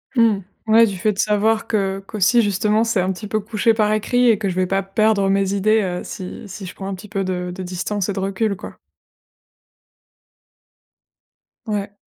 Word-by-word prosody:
Mmh. 230 -4 +4 0.3
Ouais, 225 +1 +6
du 200 -4 -3
fait 210 +3 +1
de 195 - -11
savoir 215 +1 +2
que 195 -3 0
qu'aussi 215 +3 +3
justement, 210 +1 +1
c'est 230 -3 0
un 185 +1 0
petit 210 +3 -8
peu 215 +1 0
couché 220 +1 +1
par 215 -1 +1
écrit 245 +4 +2
et 220 - +4
que 200 -1 -2
je 180 - -3
vais 185 0 +1
pas 195 +1 0
perdre 200 0 +2
mes 195 0 +1
idées, 215 +2 +3
heu, 180 -2 -2
si 185 -1 -7
si 195 0 -8
je 185 - -9
prends 195 - -6
un 195 - -3
petit 185 +3 -11
peu 195 -2 -2
de 180 -1 -3
de 190 - -6
distance 185 +2 -3
et - - 0
de 195 - -4
recul, 195 +2 -1
quoi. - - -10 2.9
Ouais. 205 -2 -3
200 Hz, 200 wpm, -20 LUFS, 190-215 Hz, 2.9 s, Ouais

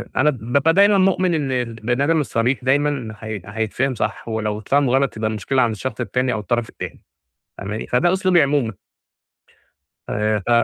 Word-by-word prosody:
أنا 150 +3 +4
بابقى 135 +5 +1
دايمًا 200 +1 +5
مؤمن 185 -1 +2
إن 145 -4 -1
البني 120 +1 -1
آدم 160 +2 +2
الصريح 125 0 0
دايمًا 135 -4 0
ح 105 - -12 0.3
حيتفهم 115 +4 -1
صح، 105 +1 -3
ولو 110 -2 -2
اتفهم 135 +5 +1
غلط 135 -1 +1
يبقى 110 0 -1
المشكلة 110 +5 0
عند 120 -2 +2
الشخص 130 +6 -5
التاني، 125 +1 0
أو - - -2
الطرف 120 +3 -1
التاني - - -8 0.6
فاهماني؟ 105 +3 -5
فده 170 +8 +2
أسلوبي 185 -3 +3
عمومًا. 140 -5 +1 1.4
آآ، 105 0 0
ف - - -1
125 Hz, 165 wpm, -21 LUFS, 110-145 Hz, 1.4 s, دايمًا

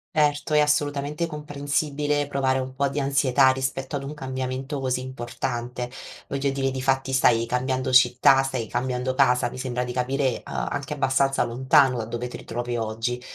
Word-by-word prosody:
Erto, 150 0 +2
è - - +6
assolutamente 150 +2 0
comprensibile 145 -1 -1
provare 135 -2 +1
un 130 0 -4
po' 140 +1 0
di 140 +2 -3
ansietà 135 -1 +3
rispetto 130 +1 -3
ad 140 - -2
un 140 +2 -6
cambiamento 130 +1 -4
così 130 -1 -1
importante. 125 -1 -4 0.4
Voglio 140 0 -1
dire, 135 0 -1
difatti, 135 0 0
stai 115 -3 +4
cambiando 130 +1 -1
città, 125 +1 +6
stai 130 -3 -2
cambiando 125 +2 -2
casa, 125 -2 +3
mi 130 - -8
sembra 125 -1 -2
di 125 0 -5
capire, 130 +1 0
uhm, - - -8 0.2
anche 145 0 -3
abbastanza 135 0 +2
lontano 130 +2 +3
da 115 - -3
dove 120 +2 -4
ti - - -8
ritrovi 120 +1 -4
oggi. 115 +2 -2
130 Hz, 165 wpm, -24 LUFS, 125-140 Hz, 0.4 s, è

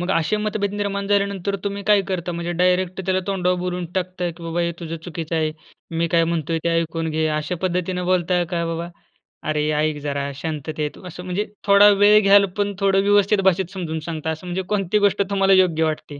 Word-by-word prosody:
मग 175 - -2
असे 165 +6 +1
मत 210 0 -2
भेद 200 -1 -1
निर्माण 200 -1 -2
झाल्यानंतर 200 -1 0
तुम्ही 200 0 -3
काय 205 -2 +5
करता? 175 -2 -2
म्हणजे 170 0 -3
डायरेक्ट 180 +1 +1
त्याला 185 0 +1
तोंडावर 180 -2 0
बोलून 180 -1 -3
टाकता, 180 -1 -2
की 170 +1 -13
बाबा 165 +1 -2
"हे 170 0 0
तुझं 165 0 -5
चुकीचं 165 -1 -5
आहे. 155 -1 +1 0.4
मी 165 0 -1
काय 165 0 +3
म्हणतोय 165 -1 -1
ते - - +2
ऐकून 165 0 -3
घे" 155 0 0
अशा 155 +3 -2
पद्धतीनं 180 0 -1
बोलताय? 180 -1 +1
का 170 0 -2
बाबा 165 +1 -3 0.6
"अरे 150 0 0
ऐक 155 -1 0
जरा 140 -1 -2
शांततेत," 150 0 -4
असं 180 0 -8
म्हणजे 185 +3 -2 0.2
थोडा 200 +1 +7
वेळ 205 +1 +6
घ्याल 200 0 +6
पण 205 0 0
थोडं 195 0 +3
व्यवस्थित 205 0 +3
भाषेत 185 0 -2
समजून 160 -4 -4
सांगता, 160 -1 -3
असं 160 +3 -5
म्हणजे 180 +2 -2
कोणती 200 -1 +1
गोष्ट 200 - +2
तुम्हाला 195 -1 +3
योग्य 180 -4 +3
वाटते? 155 -2 -3
180 Hz, 200 wpm, -21 LUFS, 165-195 Hz, 0.6 s, थोडा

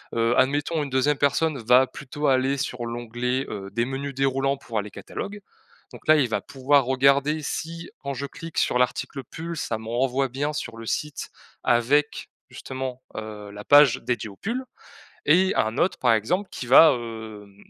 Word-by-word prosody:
heu, 115 +1 +2
admettons, 145 +4 +1
une 145 - -5
2e 135 +2 +2
personne 145 +1 +1
va 125 +3 +5
plutôt 145 +3 -4
aller 135 +1 +2
sur 125 -2 -3
l'onglet, 120 +2 -2
heu, 100 -1 -6
des 115 +3 0
menus 135 +2 -4
déroulants 135 +1 +1
pour 115 -5 -4
aller 105 0 -6
catalogue. 205 - -7 0.5
Donc, - - -13
là, 155 - +8
il 140 -4 +3
va 110 - -1
pouvoir 140 +1 +2
regarder 140 +4 +3
si, 165 +3 -5
quand 140 0 -3
je 140 +1 -4
clique 165 +3 -9
sur - - +2
l'article 125 +2 -1
«pull», 170 +1 -5
ça 115 - -2
me 110 0 -10
renvoie 130 +3 0
bien 140 +4 -2
sur 150 -5 -5
le 115 - -8
site 150 +5 -3 0.3
avec, 140 +5 +2 0.2
justement, 130 -1 -6
heu, 105 -2 -7
la 105 0 -9
page 145 -2 +7
dédiée 120 -3 -2
aux 100 - -13
pulls 240 - -4 0.6
et 185 +5 +4
un 110 +4 0
autre, 185 - +2
par 125 -3 +3
exemple, 180 - 0
qui 125 - -6
va, 145 +5 +8
hem, 110 -4 -7
130 Hz, 180 wpm, -24 LUFS, 120-145 Hz, 0.6 s, là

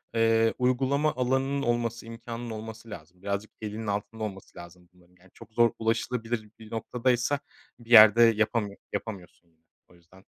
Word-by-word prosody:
eee, 115 0 +3
uygulama 135 +4 +1
alanının 130 +2 0
olması, 120 -2 -1
imkânının 115 +1 -7
olması 110 +1 -8
lazım. 90 -1 -11
Birazcık 100 +1 -3
elinin 110 +1 -5
altında 105 +2 -3
olması 95 -3 -7
lazım 85 0 -13
bunların. 90 0 -25
Yani 95 0 -22
çok - - -15
zor 115 0 +4
ulaşılabilir 115 0 -2
bir 110 -1 -13
noktadaysa 125 +4 0 0.4
bir 120 -1 -17
yerde 110 0 +9
yapamıyor, 110 -2 +1 0.2
yapamıyorsun 100 -4 -7
yine. 80 -1 -38 0.3
O - - -19
yüzden 90 +2 -21
115 Hz, 150 wpm, -27 LUFS, 100-120 Hz, 0.4 s, yerde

